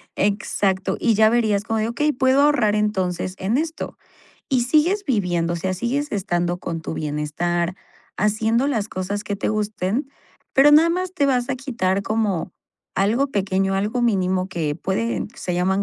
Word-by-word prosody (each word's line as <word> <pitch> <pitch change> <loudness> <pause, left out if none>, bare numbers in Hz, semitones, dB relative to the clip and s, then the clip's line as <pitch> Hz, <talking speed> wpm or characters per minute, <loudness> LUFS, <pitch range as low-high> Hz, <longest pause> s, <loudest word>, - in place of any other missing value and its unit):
exacto. 200 -1 0
Y 230 - +3
ya 215 +1 +5
verías 220 -4 +2
como 225 0 -1
de: 215 - 0
"Okey, 295 +6 +1
puedo 260 +2 +3
ahorrar 245 -8 +3
entonces 185 -4 -1
en 205 +6 0
esto", 320 +2 -4 0.5
y 255 -3 +2
sigues 325 +10 +2
viviendo, 175 -8 0
o - - -2
sea, 185 +2 -2
sigues 270 +9 -2
estando 175 -3 -1
con 165 -2 -4
tu 160 - -4
bienestar, 165 +4 -2 0.4
haciendo 220 +5 +1
las 225 -7 -1
cosas 200 +2 -4
que 205 - -2
te - - -2
gusten, 215 +4 -1 0.5
pero 285 +2 +6
nada 320 +3 +6
más 365 +1 -2
te 285 -6 +2
vas 250 -2 +1
a 260 - -1
quitar 200 -8 -1
como 205 -6 -1 0.4
algo 225 +9 +2
pequeño, 195 -4 0 0.3
mínimo 185 -4 +1
que 160 -5 -2
puede 205 +7 -2
se 180 - -4
llaman 190 +3 +1
210 Hz, 165 wpm, -22 LUFS, 185-250 Hz, 0.5 s, pero